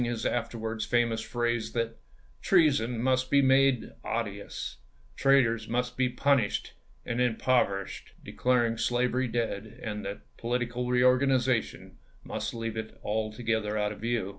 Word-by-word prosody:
his 120 -2 -3
afterwards 115 -2 -2
famous 115 -2 +1
phrase 120 -1 -2
that 115 -1 -2 0.2
" - - -31
treason 140 -10 +3
must 130 0 +1
be 140 - +5
made 135 -2 +3
odious, 105 -3 -4 0.4
traitors 120 -5 +3
must 125 +1 -1
be 130 0 +1
punished 135 -4 +1 0.3
and 115 - -2
impover 120 -4 +2
ished"; - - -11
declaring 120 -2 +1
slavery 125 +2 +1
dead, 110 -3 -3
and 105 -2 -4
that 100 +1 -5 0.2
political 120 +1 -2
pampMet. 125 - -2
reorganization 125 -1 +2 0.2
must - - -4
leave 115 -1 -4
it 110 0 -6
altogether 110 0 -1
out 105 0 0
of 105 - -9
view. 115 -4 -1
120 Hz, 140 wpm, -29 LUFS, 110-125 Hz, 0.4 s, be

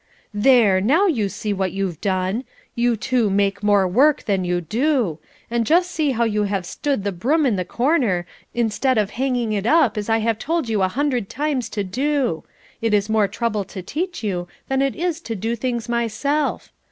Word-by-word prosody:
"There! 205 -3 +4
now 310 - +3 0.2
see 205 +1 -3
what 190 -2 -2
you 195 0 -1
have 170 -5 -6
done! 190 +4 -1 0.3
You 240 -1 +1
two 240 -1 +1
make 200 0 +1
more 205 -2 +3
work 270 +11 +3
than 195 -4 0
you 180 0 0
do; 225 - 0 0.3
and 235 -1 +1
just 350 +7 +2
see 310 -4 0
how 235 -3 +1
you 210 -2 +1
have 195 -2 -2
stood 275 +3 -2
the 200 - -1
broom 275 - +1
in 240 -6 +2
the 185 - -1
corner, 235 - +1 0.3
instead 240 +2 0
of 210 -2 +1
hanging 245 -4 -1
it 205 +1 -1
up, 265 -8 +3
as 205 - -5
I 225 - +3
have 225 0 0
told 325 -1 -1
you 215 -3 0
a 190 - +3
hundred 250 -1 -1
times 280 -5 -2
to 205 - +1
do. 255 - -1 0.4
It 225 -2 +2
is 205 +1 0
more 215 -2 +3
trouble 215 0 -2
to 185 0 -8
teach 345 - -4
you 180 -4 -2 0.2
than 270 0 +1
it 275 -1 0
is 335 -1 -2
to 230 - -5
do 225 +4 -2
things 235 -1 -3
myself. 240 +6 -1
225 Hz, 200 wpm, -21 LUFS, 200-270 Hz, 0.4 s, There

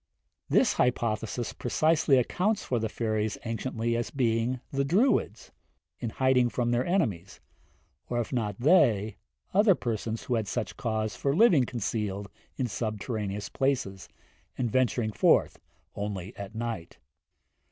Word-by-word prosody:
This - - +4
hypothesis 115 -1 -1
precisely 155 +2 +2
accounts 185 - +1
for 125 - 0
the 110 0 -2
fairies 110 -1 -1
anciently 115 0 -2
as 120 0 -2
being 120 -1 0
the 140 0 0
Druids, 190 - +1 0.5
in 115 - -3
hiding 130 0 +2
from 120 0 -1
their 120 +1 +2
enemies, 110 - -1 0.7
or 120 - 0
if 120 - -3
not 105 -5 -1
they, 115 - +3 0.4
other 200 0 +5
persons 115 -3 -3
who 125 - -2
had 110 -3 0
such - - -3
cause 110 -1 -2
for 140 0 0
living 175 - +5
concealed 105 -4 -3 0.3
in 130 - 0
subterraneous 105 -2 -3
places, 125 -9 -1 0.5
and 120 -3 -1
venturing 120 -3 +1
forth - - +3 0.4
only 100 0 -5
at 100 +1 -8
night. 115 -7 -5
115 Hz, 130 wpm, -28 LUFS, 110-130 Hz, 0.7 s, other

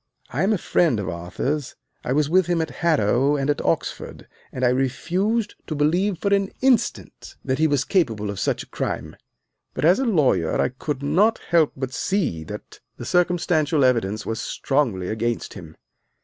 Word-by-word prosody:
I 135 - -1
am 195 +4 +2
a 215 - +2
friend 165 -8 +1
of 100 - -3
Arthur's, 110 - -3 0.3
I - - -3
was 145 +2 +2
with 180 +2 +3
him 175 -1 +1
at 160 -1 -2
Harrow 140 -3 +2
and 140 0 +1
at 145 - -2
Oxford, - - -3 0.2
and 130 0 -1
I - - +5
refused 180 - 0
to 155 - -3
believe 175 +6 +1
for 200 +4 0
an 200 -1 +2
instant 250 -3 0
that 130 0 -1
he 160 - +4
was 145 -3 +1
capable 110 - 0
of 100 - -6
such - - -1
a - - -18
crime; - - -4 0.6
but - - 0
as 175 +7 +5
a 270 - 0
lawyer 145 - +2
I - - +2
could 135 +2 -5
not 195 +11 +3
help 165 -3 +4
but 130 -1 -4
see 165 - -1
that - - -9 0.2
the - - -7
circumstantial 165 -4 +2
evidence 110 -4 +1
was 115 0 -3
strongly 120 -11 -1
against 115 +3 -2
him. 80 -2 -11
145 Hz, 180 wpm, -23 LUFS, 125-175 Hz, 0.6 s, I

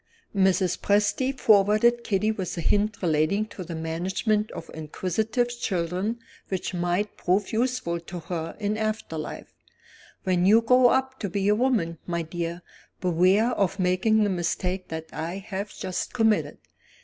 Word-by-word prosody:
Mrs. 190 -2 +2
Presty 210 +6 +2
favored 220 0 +4
Kitty 210 0 +1
with 190 -5 -4
a - - -1
hint 205 +4 +1
relating 165 +6 +2
to 185 - -7
the 170 -1 -6
management 185 +7 -1
of - - -8
inquisitive 215 +10 -1
children 195 -2 -2 0.3
which 190 -1 -3
might 175 +4 -1
prove 190 +4 0
useful 235 -7 0
to 170 +1 -8
her 165 -1 -5
in 210 0 -1
after 215 -6 -2
life. 155 - -6 0.7
"When 180 -1 +2
you 225 +3 +6
grow 250 +2 +6
up 265 +1 +1
to 200 - -3
be 195 +2 -1
a - - +5
woman, 210 -9 +1
my 170 -1 -1
dear, 170 +1 -4 0.4
beware 185 +6 +3
of 195 -4 0
making 190 +4 +2
the 205 - +1
mistake 180 +1 -2
that 160 0 -5
I 170 +4 -4
have 195 +1 -5
just 185 -2 -4
committed. 225 -3 +2
195 Hz, 150 wpm, -26 LUFS, 175-220 Hz, 0.7 s, you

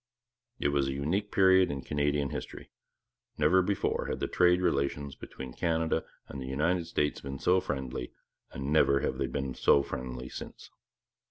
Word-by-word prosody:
It 70 - +1
was 70 -1 +1
a 70 - -1
unique 85 +10 -1
period 95 -1 +5
in 70 -2 -4
Canadian 75 -1 0
history. - - -7 0.7
Never 95 +3 +4
before 100 +2 -1
had - - -3
the - - -1
trade 90 0 +4
relations 70 -4 0
between 65 -2 -9
Canada 80 -1 0 0.2
and 70 - -7
the 65 - -6
United 80 +6 0
States 75 -3 -1
been 70 0 -6
so 90 +6 +3
friendly, 65 -7 -4 0.4
and 70 +2 -3
never 70 -3 +4
have - - -2
they 70 - 0
been 65 0 -3
so 70 +3 +4
friendly 65 -1 -5
since. - - -9
70 Hz, 165 wpm, -30 LUFS, 70-85 Hz, 0.7 s, period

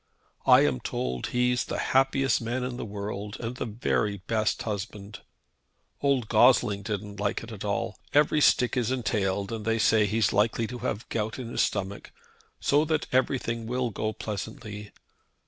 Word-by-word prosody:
I - - +8
am 65 - +2
told 60 0 -3
he's 125 0 +1
the - - -3
happiest 135 0 +2
man 120 +3 -2
in 125 -1 -3
the - - -5
world, 105 0 -5
and 120 +1 -4
the - - -3
very 105 -2 0
best 110 -2 0
husband. 105 -1 -5 0.8
Old 135 -5 +2
Gossling 110 -2 +4
didn't 105 -1 -5
like 100 +2 -1
it 115 - -9
at 105 -3 -7
all, 105 +2 -2
but - - +2
every 150 0 +4
stick 125 -3 +4
is 125 -3 +1
entailed, 100 -5 -1
and 110 -2 -4
they 115 +1 +1
say 110 -1 +4
he's 110 0 +1
likely 110 +3 +2
to 120 +3 -6
have 115 -3 -3
gout 110 0 -2
in 125 -3 -6
his - - +1
stomach, 100 -1 -2 0.5
so 145 +2 +3
that 155 -1 0
everything 120 -3 0
will 125 0 -1
go 110 +1 -2
pleasantly. 105 0 -6
110 Hz, 170 wpm, -27 LUFS, 105-125 Hz, 0.8 s, I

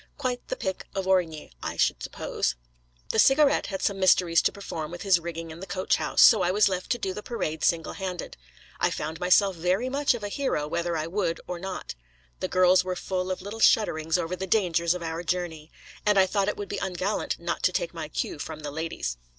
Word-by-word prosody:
Quite 250 -1 -3
the - - -2
pick 190 -1 -4
of 195 -1 -1
Origny, 175 - 0
I - - -4
should - - +2
suppose. - - -2 0.5
The 220 - +1
Cigarette 275 +4 +5
had 195 -2 -4
some 200 -1 0
mysteries 180 -3 +4
to - - +2
perform 160 -6 -6
with 175 +1 -7
his 190 -4 +4
rigging 165 -1 -6
in 160 - -10
the 190 - -8
coach 185 0 0
house; - - +3
so 220 -4 +8
I 180 - +2
was 205 +3 +4
left 185 -2 -3
to - - -3
do 195 -5 -3
the 210 - -6
parade 160 -10 -3
single 165 -1 +1
handed. 185 -3 -5 0.4
I - - +3
found 160 +2 -4
myself 185 +2 +4
very 185 +9 0
much 280 -1 +2
of 225 - -7
a 205 - -3
hero 200 - -1
whether 170 +1 -1
I 155 - -2
would 170 -1 -1
or 180 -1 -5
not. 190 +1 -5 0.5
The - - -1
girls 185 0 +4
were 185 0 -3
full 185 0 -3
of 185 0 -3
little 205 +3 -7
shudderings 160 -8 +3
over 175 +1 -2
the 190 +1 -5
dangers 170 -4 +2
of 180 - -5
our 165 0 -3
journey. 170 -3 -3 0.3
And 210 -1 +3
I 190 - +7
thought 200 +1 0
it 210 - -1
would 205 - -5
be 205 - -4
ungallant 190 +2 -2
not - - -3
to - - +3
take - - -2
my - - -6
cue 355 - -3
from 155 -1 -6
the 145 -1 -5
ladies. 150 - -3
185 Hz, 225 wpm, -26 LUFS, 165-200 Hz, 0.5 s, so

